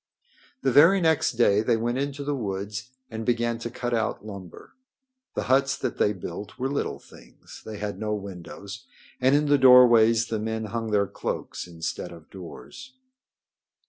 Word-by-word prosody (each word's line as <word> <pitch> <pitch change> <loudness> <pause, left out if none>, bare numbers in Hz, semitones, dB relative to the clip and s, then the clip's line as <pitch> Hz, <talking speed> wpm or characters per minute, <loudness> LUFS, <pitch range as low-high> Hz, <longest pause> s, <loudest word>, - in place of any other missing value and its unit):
The 135 - +2
very 165 +9 +7
next 160 -6 +2
day 105 -3 +3
they 115 +1 +2
went 120 +3 -1
into 140 0 -3
the 145 +1 -1
woods 100 -1 -4 0.2
and 110 0 -5
began 120 0 0
to 115 - -5
cut 120 +1 -4
out 110 -2 -1
lumber. 100 -5 -10 0.6
The - - -1
huts 135 +1 +2
that - - -4
they 105 - +3
built 100 +1 -7
were 130 +2 -2
little 140 - -2
things. - - -16
They 110 -1 -7
had 105 0 -5
no 105 -1 -1
windows, 100 +4 -9 0.3
and 130 +2 +4
in 150 +1 +2
the 145 -1 +3
doorways 120 -3 +7
the 110 -1 -3
men 110 +1 -3
hung 115 +2 -4
their 105 -1 +2
cloaks 90 - -5
instead 85 -1 -5
of 85 -2 -14
doors. 100 - -11
115 Hz, 170 wpm, -26 LUFS, 100-130 Hz, 0.6 s, very